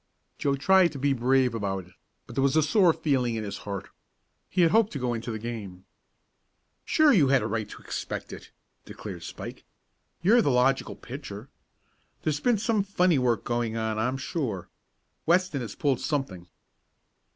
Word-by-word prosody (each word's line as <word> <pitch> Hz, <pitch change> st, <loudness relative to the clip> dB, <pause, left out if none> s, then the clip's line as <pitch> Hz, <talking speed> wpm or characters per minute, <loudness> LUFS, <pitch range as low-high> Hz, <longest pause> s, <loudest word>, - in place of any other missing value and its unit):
Joe 140 Hz, -1 st, +1 dB
tried 185 Hz, +5 st, +4 dB
to -, -, -6 dB
be 140 Hz, +1 st, +1 dB
brave 130 Hz, 0 st, +2 dB
about 95 Hz, -4 st, -3 dB
it, 90 Hz, -, -20 dB, 0.3 s
but 115 Hz, -, -11 dB
there 135 Hz, -, +1 dB
was 140 Hz, +2 st, +2 dB
a 155 Hz, -, +5 dB
sore 175 Hz, +3 st, +4 dB
feeling 130 Hz, -7 st, 0 dB
in 110 Hz, -, -3 dB
his 100 Hz, -1 st, -5 dB
heart. 100 Hz, -1 st, -5 dB, 0.6 s
He 180 Hz, -, +1 dB
had 165 Hz, -2 st, +5 dB
hoped 225 Hz, +1 st, +4 dB
to -, -, -3 dB
go 125 Hz, -2 st, -1 dB
into 115 Hz, +1 st, -5 dB
the 110 Hz, -, -3 dB
game. 105 Hz, -5 st, -7 dB, 1.0 s
"Sure 310 Hz, -3 st, +4 dB
you 155 Hz, -9 st, +5 dB
had 135 Hz, -1 st, +3 dB
a -, -, -1 dB
right 110 Hz, 0 st, -2 dB
to -, -, -11 dB
expect -, -, -5 dB
it!" -, -, -10 dB, 0.3 s
declared -, -, -8 dB
Spike. -, -, -8 dB, 0.6 s
"You're 230 Hz, +7 st, +6 dB
the 145 Hz, -, +1 dB
logical 130 Hz, +1 st, +2 dB
pitcher. 120 Hz, -3 st, -8 dB, 0.7 s
There's 150 Hz, -2 st, 0 dB
been 240 Hz, +3 st, +2 dB
some 220 Hz, 0 st, +1 dB
funny 180 Hz, -5 st, +2 dB
work 120 Hz, -3 st, +1 dB
going 120 Hz, -2 st, -1 dB
on, 110 Hz, -1 st, -1 dB
I'm 125 Hz, +4 st, 0 dB
sure. 130 Hz, -, -3 dB, 0.6 s
Weston 175 Hz, -4 st, +2 dB
has 115 Hz, -, -6 dB
pulled 140 Hz, -4 st, +1 dB
off -, -, -8 dB
something." 120 Hz, -, -3 dB
130 Hz, 180 wpm, -27 LUFS, 115-160 Hz, 1.0 s, You're